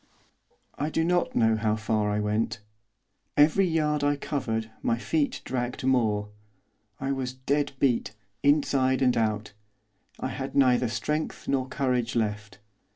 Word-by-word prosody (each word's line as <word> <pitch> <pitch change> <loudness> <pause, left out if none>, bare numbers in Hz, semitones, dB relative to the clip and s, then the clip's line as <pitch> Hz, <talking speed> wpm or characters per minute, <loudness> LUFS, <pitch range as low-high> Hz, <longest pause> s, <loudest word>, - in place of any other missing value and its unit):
I 150 - 0
do 160 +1 0
not 175 +1 +1
know 115 -1 +4
how 110 0 +1
far 110 -1 0
I 105 0 0
went. 105 0 -1 0.8
Every 160 +6 +5
yard 150 -3 +1
I 145 0 +3
covered, 115 -6 -3
my 115 - +1
feet 145 +4 -1
dragged 125 0 -3
more. 110 -6 +1 0.7
I 135 0 -2
was 130 -2 -2
dead 140 +2 -1
beat, 125 -5 +1 0.3
inside 135 -3 +3
and 125 -1 +3
out. 110 -2 -1 0.7
I - - -2
had 135 0 -5
neither 125 -2 +4
strength 150 +8 -3
nor 130 -2 0
courage 125 -4 -1
left. 105 -2 -2
130 Hz, 140 wpm, -27 LUFS, 110-145 Hz, 0.8 s, Every